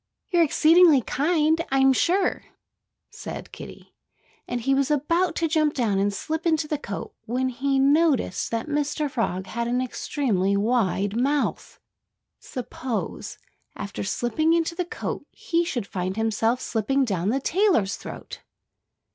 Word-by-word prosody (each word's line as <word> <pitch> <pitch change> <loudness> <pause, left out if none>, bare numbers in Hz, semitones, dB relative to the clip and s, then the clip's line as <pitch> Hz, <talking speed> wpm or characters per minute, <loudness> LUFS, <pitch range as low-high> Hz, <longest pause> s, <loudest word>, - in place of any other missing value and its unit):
"You're 350 -2 +4
exceedingly 325 -1 +5
kind, 315 +4 +1
I'm 270 0 +4
sure," 365 +7 +1 0.7
said - - -8
Kiddie. - - -11 0.5
And 245 - -3
he 270 +4 +1
was 275 +1 +1
about 335 +5 +1
to 330 - +1
jump 310 -1 +1
down 215 -7 +1
and 200 +1 +1
slip 320 +11 -3
into 315 -2 +1
the 300 -1 -2
coat 200 -7 -6
when 255 +3 0
he 270 +2 -1
noticed 280 - +2
that 230 0 -2
Mr. 295 0 -1
Frog 190 -7 -2
had 235 +5 -3
an 245 +1 0
extremely 225 -6 0
wide 205 -2 +1
mouth.... 275 +4 -1 0.6
Suppose, 250 -1 -5 0.4
after 200 0 -5
slipping 240 +10 0
into 335 0 +1
the 355 +1 -2
coat, - - -5
he 340 0 -1
should 250 - -3
find 185 +1 -4
himself 225 +2 +1
slipping 265 +5 0
down 190 -4 -1
the 265 +5 +1
tailor's 315 - +2
throat? - - -9
270 Hz, 140 wpm, -24 LUFS, 225-315 Hz, 0.7 s, exceedingly